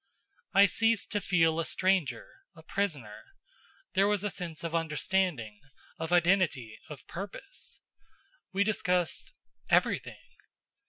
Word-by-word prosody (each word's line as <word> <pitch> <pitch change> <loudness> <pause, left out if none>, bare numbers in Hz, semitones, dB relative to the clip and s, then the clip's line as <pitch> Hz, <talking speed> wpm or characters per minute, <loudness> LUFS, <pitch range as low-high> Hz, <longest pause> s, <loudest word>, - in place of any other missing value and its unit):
I 200 - +8
ceased 225 +3 +1
to 205 - 0
feel 165 -4 +2
a 165 - 0
stranger, 185 -5 +1 0.3
a 160 - -14
prisoner. 155 - -3 0.7
There 195 +1 +4
was 205 -1 +1
a 205 - -1
sense 170 -4 -6
of 165 -1 -4
understanding, 160 - -1 0.4
of 160 +1 -4
identity, 170 - +2
of 150 -3 -10
purpose. 205 - -9 0.7
We 195 +1 +2
discussed 180 -5 0 0.4
everything. - - +1
180 Hz, 115 wpm, -30 LUFS, 160-195 Hz, 0.7 s, I